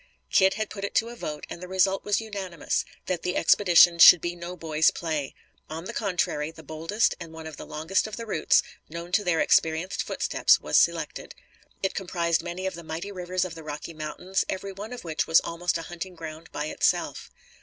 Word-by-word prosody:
Kit 190 Hz, 0 st, +4 dB
had 215 Hz, -1 st, -3 dB
put 200 Hz, -2 st, -7 dB
it 200 Hz, -, -4 dB
to 235 Hz, +2 st, +1 dB
vote 150 Hz, -9 st, -6 dB
and 170 Hz, -, -8 dB
the 180 Hz, -, -7 dB
result 190 Hz, +1 st, +1 dB
was 205 Hz, -1 st, +1 dB
unanimous, 195 Hz, -7 st, -3 dB, 0.2 s
that 180 Hz, -3 st, -2 dB
the 180 Hz, -, -2 dB
expedition 175 Hz, -3 st, +6 dB
should 180 Hz, -, +10 dB
be 175 Hz, +2 st, -3 dB
no 175 Hz, +1 st, -7 dB
boy's 160 Hz, -1 st, +2 dB
play. 155 Hz, -5 st, -3 dB, 0.3 s
On 160 Hz, +2 st, -6 dB
the -, -, -6 dB
contrary, 180 Hz, -7 st, -1 dB
the 160 Hz, 0 st, -13 dB
boldest 165 Hz, +9 st, 0 dB
and 165 Hz, -2 st, -8 dB
one 160 Hz, 0 st, -9 dB
of 160 Hz, -2 st, -8 dB
the -, -, -9 dB
longest 165 Hz, +7 st, -1 dB
of 215 Hz, -, -6 dB
the 230 Hz, -, -5 dB
routes, 170 Hz, -8 st, +3 dB, 0.3 s
known 170 Hz, +2 st, -7 dB
to 205 Hz, +2 st, +2 dB
their 175 Hz, -4 st, +1 dB
experienced 160 Hz, +4 st, +2 dB
footsteps, -, -, +2 dB
was -, -, -3 dB
selected. -, -, +1 dB, 0.5 s
It 190 Hz, -, 0 dB
comprised 170 Hz, -3 st, 0 dB
many 175 Hz, +2 st, -5 dB
of 190 Hz, -, -2 dB
the 170 Hz, 0 st, -9 dB
mighty 165 Hz, +5 st, -5 dB
rivers 185 Hz, -1 st, -2 dB
of 180 Hz, -, -6 dB
the 165 Hz, -, -9 dB
Rocky 150 Hz, +2 st, -6 dB
Mountains, 160 Hz, +5 st, -2 dB
every 195 Hz, +1 st, -4 dB
one 205 Hz, +4 st, -8 dB
of 250 Hz, -, -7 dB
which 160 Hz, -2 st, -2 dB
was 160 Hz, -, +6 dB
almost 175 Hz, +1 st, -2 dB
a 165 Hz, -, -6 dB
hunting 175 Hz, +2 st, -7 dB
ground 160 Hz, 0 st, -9 dB
by 150 Hz, -, -3 dB
itself. 155 Hz, -, 0 dB
175 Hz, 210 wpm, -26 LUFS, 160-190 Hz, 0.5 s, should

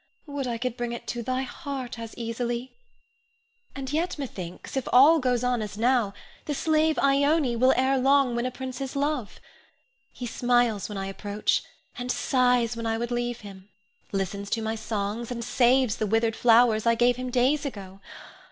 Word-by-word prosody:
Would 285 Hz, -3 st, -4 dB
I 235 Hz, -1 st, -2 dB
could 245 Hz, 0 st, -3 dB
bring 240 Hz, -1 st, -3 dB
it 235 Hz, -, -7 dB
to 240 Hz, -, -3 dB
thy 255 Hz, +2 st, -1 dB
heart 265 Hz, -3 st, -6 dB
as 230 Hz, -1 st, -8 dB
easily! 235 Hz, +2 st, -3 dB, 1.0 s
And 270 Hz, 0 st, -5 dB
yet, 335 Hz, +3 st, -1 dB
methinks, 190 Hz, -, -7 dB
if 265 Hz, -, -2 dB
all 295 Hz, +6 st, +7 dB
goes 250 Hz, -2 st, 0 dB
on 250 Hz, -2 st, +1 dB
as 210 Hz, -1 st, -6 dB
now, 235 Hz, -3 st, +2 dB, 0.3 s
the 295 Hz, -, -2 dB
slave 315 Hz, +1 st, +2 dB
Ione 280 Hz, -1 st, +3 dB
will 255 Hz, +3 st, +5 dB
ere 265 Hz, +1 st, +2 dB
long 270 Hz, -1 st, +3 dB
win 235 Hz, +1 st, 0 dB
a -, -, -1 dB
prince's 260 Hz, +1 st, -6 dB
love. 280 Hz, -5 st, -2 dB, 0.7 s
He 250 Hz, -, -7 dB
smiles 240 Hz, -3 st, +1 dB
when 210 Hz, -, -5 dB
I 195 Hz, -, -3 dB
approach, 205 Hz, +2 st, -1 dB, 0.4 s
and 245 Hz, 0 st, -2 dB
sighs 245 Hz, -3 st, +2 dB
when 230 Hz, 0 st, -4 dB
I 225 Hz, 0 st, 0 dB
would 235 Hz, +1 st, -3 dB
leave 240 Hz, 0 st, -2 dB
him; 195 Hz, -1 st, -12 dB, 0.4 s
listens 200 Hz, +1 st, -3 dB
to 225 Hz, -, -1 dB
my 220 Hz, 0 st, -1 dB
songs, 220 Hz, +1 st, -3 dB
and 235 Hz, -2 st, -4 dB
saves 245 Hz, -1 st, +3 dB
the 215 Hz, -, -1 dB
withered 225 Hz, +1 st, +1 dB
flowers 230 Hz, -2 st, +4 dB
I 230 Hz, -, +5 dB
gave 240 Hz, +1 st, +3 dB
him 255 Hz, 0 st, -4 dB
days 260 Hz, +4 st, +2 dB
ago. 195 Hz, -8 st, -7 dB
245 Hz, 180 wpm, -26 LUFS, 225-265 Hz, 1.0 s, all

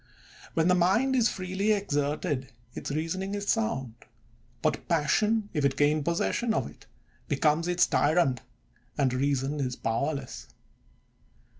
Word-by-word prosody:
When 160 Hz, +1 st, +3 dB
the 180 Hz, -, +5 dB
mind 195 Hz, +10 st, +3 dB
is 240 Hz, -2 st, +4 dB
freely 190 Hz, +3 st, -1 dB
ex 200 Hz, -6 st, -2 dB
erted, 145 Hz, -1 st, -1 dB, 0.3 s
its -, -, -6 dB
reasoning 165 Hz, +7 st, -2 dB
is 200 Hz, 0 st, -4 dB
sound; 210 Hz, -, 0 dB, 0.7 s
but -, -, 0 dB
passion, 205 Hz, +7 st, +1 dB
if 150 Hz, -4 st, 0 dB
it 140 Hz, -1 st, +2 dB
gain 150 Hz, +1 st, +2 dB
possession 200 Hz, +8 st, 0 dB
of -, -, 0 dB
it, -, -, -15 dB, 0.4 s
becomes 155 Hz, +2 st, +1 dB
its 180 Hz, 0 st, +3 dB
tyrant, 145 Hz, -4 st, +2 dB, 0.6 s
and 135 Hz, -3 st, +2 dB
reason 140 Hz, +2 st, 0 dB
is 125 Hz, -3 st, -2 dB
powerless. 135 Hz, +4 st, -3 dB
160 Hz, 135 wpm, -28 LUFS, 140-195 Hz, 0.7 s, the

